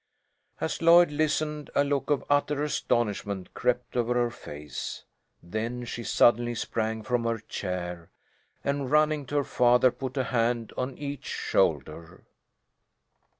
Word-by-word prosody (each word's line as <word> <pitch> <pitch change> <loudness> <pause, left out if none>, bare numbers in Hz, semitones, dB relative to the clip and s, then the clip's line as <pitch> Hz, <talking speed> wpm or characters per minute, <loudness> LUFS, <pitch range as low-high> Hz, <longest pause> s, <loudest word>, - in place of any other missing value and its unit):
As - - -2
Lloyd 170 -1 +7
listened 150 0 -1
a 140 - +4
look 140 0 -1
of 145 -2 +1
utter 145 0 +1
astonishment 105 -9 -1
crept 125 0 -1
over 120 0 +1
her 120 -1 +1
face. 75 -9 -7 0.4
Then 115 +7 -4
she 120 0 -5
suddenly 120 +2 +3
sprang 110 0 -2
from 120 +1 0
her 115 0 0
chair, 90 -5 -5 0.5
and 140 -2 -1
running 150 -1 +2
to 145 - -5
her 145 - +3
father 125 0 +4
put 130 +2 -6
a 130 - +2
hand 115 -2 0
on 130 +1 -3
each 145 -1 -6
shoulder. 80 -1 -1
125 Hz, 135 wpm, -27 LUFS, 115-145 Hz, 0.5 s, Lloyd